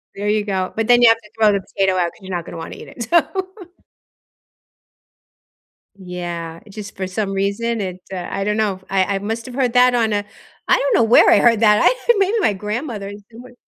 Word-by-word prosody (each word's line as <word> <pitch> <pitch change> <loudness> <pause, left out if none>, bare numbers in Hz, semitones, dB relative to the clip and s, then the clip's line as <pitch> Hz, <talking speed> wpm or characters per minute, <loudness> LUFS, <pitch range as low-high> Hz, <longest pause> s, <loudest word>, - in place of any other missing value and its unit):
There 205 +1 -3
you 210 0 0
go, 190 -2 -2
but 225 -1 0
then 245 0 +5
you 235 - +8
have 225 - +4
to 210 -2 -19
throw 215 -2 +4
the 200 - 0
potato 190 0 -1
out, 175 -2 0
'cause - - -22
you're 190 -1 -8
not 170 -1 -4
gonna - - -9
wanna 165 - -8
eat - - -11
it, 235 - -7
so 335 +9 +4 2.8
Yeah, 175 -3 -6
it's 205 - -16
just 205 -2 -8
for 190 -1 -3
some 195 +1 -3
reason, 200 +4 -1
it's, 185 -2 -7
uh 180 -2 -5
I 195 - -3
don't 210 +1 -1
know, 200 -4 -1
I 195 +1 +1
I - - -2
must 225 +3 -4
have 250 - -9
heard 255 -3 0
that 250 0 +5
on 225 -2 +1
a 205 0 -1 0.4
I - - +4
don't 280 - 0
know 230 - +4
where 225 +2 +6
I - - +6
heard 230 -2 +3
that, 210 -2 +5
I - - +5 0.2
think 475 -3 +3
maybe 400 +4 +2
my 290 - +2
grandmother 210 +1 -5
is 205 0 -11
somewhere 245 +2 -13
210 Hz, 230 wpm, -19 LUFS, 190-230 Hz, 2.8 s, you